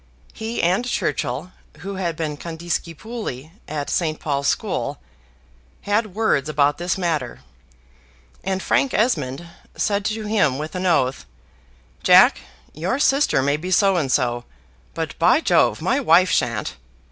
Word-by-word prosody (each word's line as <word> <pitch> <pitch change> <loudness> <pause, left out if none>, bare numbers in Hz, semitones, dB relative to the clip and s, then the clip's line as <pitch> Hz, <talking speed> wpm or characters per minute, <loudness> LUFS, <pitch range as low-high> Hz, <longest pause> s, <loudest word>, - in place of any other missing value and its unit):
He 225 +2 -4
and 180 +7 +2
Churchill, 160 - -2 0.3
who 195 0 -5
had 170 -4 -2
been 155 -2 -3
condiscipuli 170 - -5 0.2
at 145 -1 -4
St. 155 -3 -1
Paul's 140 -2 -1
School, - - -1 0.8
had 205 -1 -1
words 155 -10 +1
about 145 0 +2
this 175 +1 -1
matter; 155 - -2 1.0
and 190 0 -2
Frank 275 - +1
Esmond 155 - 0 0.3
said 200 -1 0
to 215 0 -2
him 185 -11 +2
with 155 +2 -5
an 185 0 -2
oath, 135 -6 +1 0.7
"Jack, - - +6 0.3
your 175 - -2
sister 275 - +2
may 145 +2 +1
be 175 +4 -6
so 195 0 +4
and 145 -7 0
so, 120 -2 +1 0.5
but - - -3
by - - +5
Jove - - +2
my - - +2
wife 175 +3 +4
shan't!" 105 - -1
170 Hz, 135 wpm, -22 LUFS, 145-195 Hz, 1.0 s, Jack